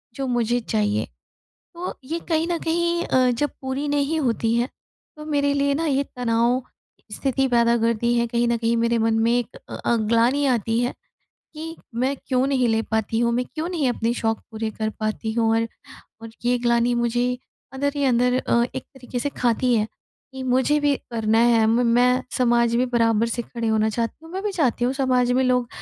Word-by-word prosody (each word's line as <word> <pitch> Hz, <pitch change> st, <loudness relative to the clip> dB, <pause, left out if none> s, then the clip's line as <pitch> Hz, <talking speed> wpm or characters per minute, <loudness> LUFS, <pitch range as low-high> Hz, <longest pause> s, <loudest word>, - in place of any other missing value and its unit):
जो 275 Hz, -, -3 dB
मुझे 240 Hz, -1 st, +1 dB
चाहिए। 210 Hz, -2 st, 0 dB, 0.7 s
तो 355 Hz, +2 st, -4 dB
ये 325 Hz, +6 st, -3 dB
कहीं 325 Hz, 0 st, +1 dB
न 340 Hz, -, 0 dB
कहीं 340 Hz, +1 st, 0 dB
अ, 255 Hz, -1 st, +3 dB
जब 290 Hz, +5 st, 0 dB
पूरी 265 Hz, +2 st, -3 dB
नहीं 290 Hz, +2 st, 0 dB
होती 230 Hz, -4 st, 0 dB
है 240 Hz, +1 st, +1 dB, 0.5 s
तो 300 Hz, -, -9 dB
मेरे 285 Hz, -2 st, +1 dB
लिए 280 Hz, 0 st, +1 dB
ना 325 Hz, +4 st, -1 dB
ये 280 Hz, -2 st, +1 dB
तनाव 240 Hz, +1 st, +1 dB, 0.5 s
स्थिति 270 Hz, 0 st, 0 dB
पैदा 235 Hz, -1 st, +3 dB
करती 230 Hz, +1 st, +1 dB
है 235 Hz, -, +2 dB
कहीं 235 Hz, +1 st, 0 dB
न 235 Hz, -, +1 dB
कहीं 230 Hz, 0 st, 0 dB
मेरे 235 Hz, 0 st, +2 dB
मन 225 Hz, -, +2 dB
में 230 Hz, -, +3 dB
एक 245 Hz, 0 st, -4 dB
अ -, -, -6 dB
अ, 235 Hz, -, 0 dB
ग्लानि 235 Hz, +6 st, +2 dB
आती 230 Hz, -2 st, +1 dB
है 245 Hz, +1 st, 0 dB, 0.6 s
कि 325 Hz, +2 st, -7 dB, 0.2 s
मैं 260 Hz, +4 st, 0 dB
क्यों 255 Hz, 0 st, +1 dB
नहीं 260 Hz, -3 st, +1 dB
ले 225 Hz, 0 st, +1 dB
पाती 220 Hz, 0 st, -1 dB
हूँ? 235 Hz, 0 st, +2 dB
मैं 250 Hz, +1 st, 0 dB
क्यों 320 Hz, +2 st, -3 dB
नहीं 320 Hz, -8 st, 0 dB
अपने 235 Hz, -1 st, 0 dB
शौक 225 Hz, -2 st, -1 dB
पूरे 220 Hz, 0 st, -3 dB
कर 215 Hz, 0 st, -3 dB
पाती 215 Hz, +1 st, -2 dB
हूँ? 225 Hz, -1 st, +1 dB
और, 230 Hz, 0 st, 0 dB, 0.5 s
और 225 Hz, 0 st, -9 dB
ये 245 Hz, +1 st, +3 dB
ग्लानि 235 Hz, 0 st, +2 dB
मुझे 240 Hz, +1 st, +1 dB, 0.5 s
अंदर 285 Hz, +2 st, 0 dB
ही 285 Hz, -, -1 dB
अंदर 250 Hz, 0 st, +3 dB
अ, 235 Hz, -2 st, +2 dB
एक 260 Hz, -, -4 dB
तरीके 250 Hz, -2 st, -7 dB
से 285 Hz, -, -1 dB
खाती 245 Hz, +1 st, +2 dB
है 215 Hz, 0 st, +1 dB, 0.5 s
कि 265 Hz, -, -6 dB
मुझे 260 Hz, +4 st, +2 dB
भी 290 Hz, -1 st, +2 dB, 0.2 s
करना 225 Hz, -1 st, +1 dB
है 230 Hz, -1 st, +4 dB
म 235 Hz, +2 st, +3 dB
मैं 250 Hz, +2 st, +3 dB
समाज 235 Hz, -2 st, +3 dB
भी 250 Hz, -, +2 dB
बराबर 230 Hz, -2 st, +2 dB
से 240 Hz, +1 st, -2 dB
खड़े 235 Hz, 0 st, -5 dB
होना 220 Hz, 0 st, +2 dB
चाहती 230 Hz, +8 st, -3 dB
हूँ, 325 Hz, -, -12 dB
मैं 380 Hz, -, -3 dB
भी 420 Hz, -, -1 dB
चाहती 260 Hz, -, +1 dB
हूँ 255 Hz, -, 0 dB
समाज 255 Hz, -2 st, +1 dB
में 255 Hz, +1 st, +2 dB
लोग 250 Hz, -1 st, +2 dB
245 Hz, 205 wpm, -23 LUFS, 230-270 Hz, 0.7 s, है